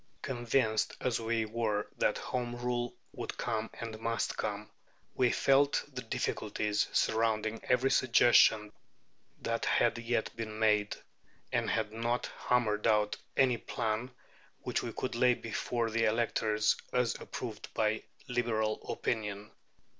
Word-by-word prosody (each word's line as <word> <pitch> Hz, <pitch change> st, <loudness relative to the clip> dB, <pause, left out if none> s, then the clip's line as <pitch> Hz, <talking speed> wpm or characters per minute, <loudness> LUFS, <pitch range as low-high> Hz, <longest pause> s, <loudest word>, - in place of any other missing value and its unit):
Convinced 120 Hz, -3 st, 0 dB
as 125 Hz, -3 st, 0 dB
we 115 Hz, 0 st, 0 dB
were 110 Hz, -2 st, -1 dB
that -, -, +2 dB
Home 125 Hz, -1 st, -3 dB
Rule 120 Hz, 0 st, -2 dB, 0.2 s
would -, -, -5 dB
come 110 Hz, -2 st, -2 dB
and 110 Hz, -2 st, -6 dB
must 115 Hz, 0 st, -1 dB
come, 105 Hz, 0 st, -4 dB, 0.4 s
we 125 Hz, -1 st, +3 dB
felt 140 Hz, +1 st, +3 dB
the 125 Hz, -, -4 dB
difficulties 105 Hz, -3 st, -1 dB
surrounding 110 Hz, 0 st, +1 dB
every 125 Hz, +2 st, +3 dB
suggestion 115 Hz, -4 st, +5 dB, 0.7 s
that -, -, -1 dB
had -, -, +2 dB
yet 120 Hz, -1 st, -1 dB
been 110 Hz, -2 st, -5 dB
made, 105 Hz, -2 st, +2 dB, 0.6 s
and -, -, +1 dB
had 110 Hz, -2 st, 0 dB
not 120 Hz, +2 st, -1 dB, 0.2 s
hammered 115 Hz, -4 st, +2 dB
out 105 Hz, -1 st, +3 dB, 0.2 s
any 125 Hz, -3 st, +4 dB
plan 115 Hz, +2 st, -2 dB, 0.5 s
which -, -, -1 dB
we -, -, -4 dB
could 130 Hz, -, -3 dB
lay 125 Hz, +1 st, +4 dB
before 115 Hz, +1 st, -2 dB
the 115 Hz, +1 st, +2 dB
electors 110 Hz, -1 st, +2 dB
as 125 Hz, -2 st, +2 dB
approved 110 Hz, -4 st, -6 dB
by 110 Hz, 0 st, +1 dB, 0.3 s
Liberal 110 Hz, -3 st, 0 dB
opinion. 105 Hz, -2 st, -3 dB
115 Hz, 130 wpm, -32 LUFS, 110-120 Hz, 0.7 s, suggestion